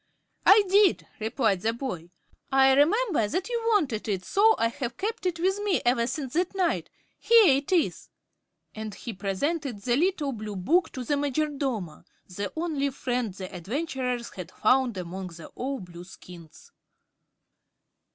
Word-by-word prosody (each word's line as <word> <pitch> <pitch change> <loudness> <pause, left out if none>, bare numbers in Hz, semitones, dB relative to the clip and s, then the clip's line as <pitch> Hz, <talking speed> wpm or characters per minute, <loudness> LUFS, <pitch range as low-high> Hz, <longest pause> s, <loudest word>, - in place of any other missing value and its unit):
"I 415 +1 +8
did," 395 0 +4
replied 220 -3 0
the 225 +2 0
boy. 230 -10 -5 0.4
"I 270 0 +5
remember 320 - +3
that 365 - -2
you 475 -1 -1
wanted 300 - +1
it - - 0
and 185 -1 -10
so 440 +3 +4
I 230 - +2
have 240 0 -5
kept 440 -1 -2
it 340 -2 -2
with 380 +3 +1
me 410 -4 +1
ever 240 -1 +2
since 265 0 -4
that 360 +4 0
night. 365 -3 0 0.3
Here 430 - +6
it 280 +5 -5
is," 350 -4 0 0.6
and 215 -2 -6
he 235 +3 -7
presented 210 - -2
the 240 -1 +2
little 315 -2 +1
blue 215 -4 -6
book 320 - +2
to 255 - -5
the 290 +4 0
Majordomo, 275 - -2 0.2
the 200 +2 -5
only 315 -4 -1
friend 250 -4 -2
the 185 +1 -8
adventurers 250 - -3
had 180 -2 -8
found 250 +1 +2
among 185 +1 -5 0.2
all 270 +2 -3
the 180 -2 -11
Blueskins. 175 -2 -13
265 Hz, 155 wpm, -27 LUFS, 210-335 Hz, 0.6 s, I